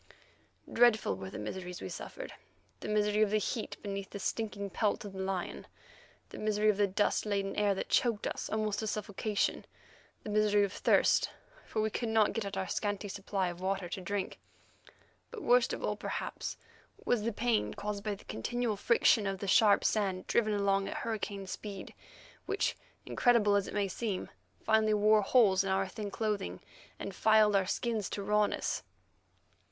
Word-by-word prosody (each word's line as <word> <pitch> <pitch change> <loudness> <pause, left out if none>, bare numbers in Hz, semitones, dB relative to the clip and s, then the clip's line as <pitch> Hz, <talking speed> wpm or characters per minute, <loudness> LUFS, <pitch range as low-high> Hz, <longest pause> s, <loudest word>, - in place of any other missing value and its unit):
Dreadful 235 - +4
were 95 0 -7
the - - -7
miseries 180 - -5
we - - -5
suffered—the - - -10
misery 210 0 +2
of 215 - +4
the 215 - +2
heat 215 +2 -3
beneath 200 -1 -4
the - - -6
stinking 200 -1 -3
pelt 210 0 0
of 200 - -7
the 190 - -7
lion, 190 -2 -3 0.6
the - - -9
misery 215 0 +2
of 200 - -6
the 205 -1 +3
dust 200 +2 +1
laden 200 -2 -1
air 205 -1 +2
that - - -3
choked 230 -4 +2
us - - -3
almost 215 -1 -1
to 220 - -2
suffocation, 210 0 -1 0.6
the 210 - -5
misery 210 -1 +3
of 200 0 -1
thirst, - - +3 0.4
for 215 - -1
we 220 - 0
could 235 +1 -2
not 220 -1 +3
get 225 -3 -2
at 200 -1 -5
our 190 0 -2
scanty 205 -1 -2
supply 195 -1 -2
of 175 +1 -8
water 190 -1 -1
to 190 - -5
drink. 195 +1 -3 0.9
But 455 -4 -8
worst 245 0 +4
of - - -4
all - - 0
perhaps, - - -4 0.5
was 245 -3 +2
the 230 +2 -1
pain 230 +1 0
caused 205 -1 -4
by 210 -1 -2
the 195 - -17
continual 230 - -2
friction 220 -1 +3
of 195 0 -2
the 200 - -5
sharp 200 +1 +5
sand 195 -4 0
driven 215 -2 +2
along 195 -1 +1
at - - -4
hurricane 205 -3 -3
speed, 195 +1 -7 0.5
which, - - 0 0.3
incredible 230 -5 +3
as 200 -1 +1
it - - -7
may 205 -1 +1
seem, 195 0 -3 0.3
finally 220 -1 +3
wore 210 +1 +5
holes 195 -3 +4
in 195 - -2
our 190 0 +1
thin 205 +2 -5
clothing 200 - -2 0.4
and 195 - -6
filed 215 +1 +4
our 195 -1 +2
skins 225 -2 -1
to 200 - -4
rawness. 210 +1 +1
205 Hz, 180 wpm, -32 LUFS, 195-215 Hz, 0.9 s, sharp